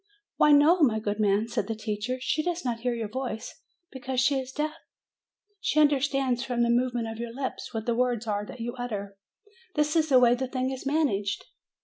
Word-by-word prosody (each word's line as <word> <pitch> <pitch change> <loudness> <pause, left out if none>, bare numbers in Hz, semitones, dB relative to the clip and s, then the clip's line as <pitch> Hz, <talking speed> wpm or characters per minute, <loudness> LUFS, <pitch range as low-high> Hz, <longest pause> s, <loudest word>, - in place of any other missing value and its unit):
"Why, 300 - +5
no, 305 +5 +6
my 230 -7 +4
good 210 0 -3
man," 210 +1 +2
said 235 +1 -2
the 225 - -2
teacher; 215 +3 -3
"she 300 +4 0
does 350 -1 -3
not 235 -2 -1
hear 245 0 -1
your 225 -2 -3
voice, 240 -1 -5 0.3
because 260 -1 -3
she 270 +1 +3
is 260 0 -6
deaf. 300 +2 -2 0.9
She 310 - +1
understands 275 -3 +2
from 245 -2 0
the 235 - +2
movements 240 -2 0
of 225 - -8
your 235 0 -4
lips 260 +2 -5
what 225 -2 -4
the 235 - +1
words 240 -1 0
are 205 -2 -1
that 250 - -10
you 240 +1 -3
utter; 200 -5 -4 0.6
this 300 0 +1
is 315 -1 +2
the 265 - +6
way 240 -1 +5
the 260 +1 -2
thing 255 0 -2
is 265 +1 -5
managed. 240 -10 0
245 Hz, 210 wpm, -27 LUFS, 225-275 Hz, 0.9 s, no